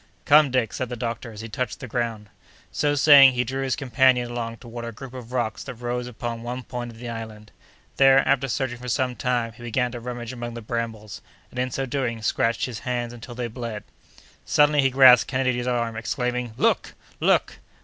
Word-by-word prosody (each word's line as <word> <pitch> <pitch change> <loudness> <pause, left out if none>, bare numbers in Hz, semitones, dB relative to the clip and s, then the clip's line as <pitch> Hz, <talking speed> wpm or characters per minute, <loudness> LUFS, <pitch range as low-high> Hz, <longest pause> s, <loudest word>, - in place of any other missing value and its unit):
"Come, 150 0 +6
Dick," 125 -4 0
said 130 - -3
the 125 - -4
doctor, 115 0 -4
as 105 -1 -9
he 115 - -6
touched 115 +1 -4
the 130 - -7
ground. 115 -3 -3 0.4
So 145 0 +1
saying, 140 -2 +8
he 125 0 +1
drew 135 +3 -4
his 130 -2 0
companion 125 -2 +2
along 115 -1 -4
toward 120 0 -8
a 115 - -5
group 125 +3 -10
of 125 -2 -9
rocks 120 -4 -2
that 125 - -7
rose 120 +1 -3
upon 115 -1 -5
one 125 +2 -5
point 120 0 -6
of 115 - -12
the 120 +1 -8
island; 110 -2 -8 0.5
there, 135 0 +6
after 135 0 +2
searching 120 -1 -2
for 125 - -8
some 125 +1 0
time, 120 -3 -1
he 110 - -16
began 120 +1 -1
to 120 - -6
rummage 120 0 -6
among 120 -1 -6
the 115 - -6
brambles, 110 -3 -5 0.3
and, 125 - -6
in 125 0 0
so 135 +2 -2
doing, 125 -4 -3
scratched 115 +2 +1
his 120 -3 -6
hands 120 -2 -3
until 120 0 -10
they 125 0 -3
bled. 115 -2 -6 0.6
Suddenly 150 0 +4
he 135 - +3
grasped 130 -2 +7
Kennedy's 130 -2 0
arm, 120 -2 -1
exclaiming: 125 0 -3
"Look! - - +1 0.2
look!" - - +2
120 Hz, 205 wpm, -24 LUFS, 115-130 Hz, 0.6 s, saying